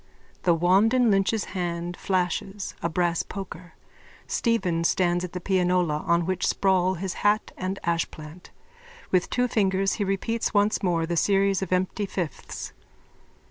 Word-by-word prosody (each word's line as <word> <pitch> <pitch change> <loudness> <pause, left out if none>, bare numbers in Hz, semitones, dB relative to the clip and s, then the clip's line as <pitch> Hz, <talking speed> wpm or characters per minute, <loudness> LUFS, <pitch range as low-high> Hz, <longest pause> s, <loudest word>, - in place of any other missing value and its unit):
_(The 170 -2 +4
wand 195 +7 +4
in 245 -3 +4
Lynch's 200 +2 +2
hand 175 -1 -3
flashes: 190 +2 -2
a 170 - 0
brass 170 0 +1
poker. 180 -3 -8 0.5
Stephen 190 -8 0
stands 175 0 +2
at 180 - -6
the 180 - -3
pianola 180 -4 +1
on 170 0 +3
which 185 0 -1
sprawl 185 -1 +2
his 185 +1 -4
hat 205 +1 +2
and 185 +1 -3
ashplant. 165 0 -3 0.6
With 185 -1 +2
two 250 0 +1
fingers 195 -4 +1
he - - +3
repeats 210 +4 -1
once 205 +1 +3
more 170 -3 +1
the 170 +1 -2
series 195 +1 +2
of 190 - -4
empty 185 +3 0
fifths. 175 -7 -5
185 Hz, 145 wpm, -25 LUFS, 175-195 Hz, 0.6 s, The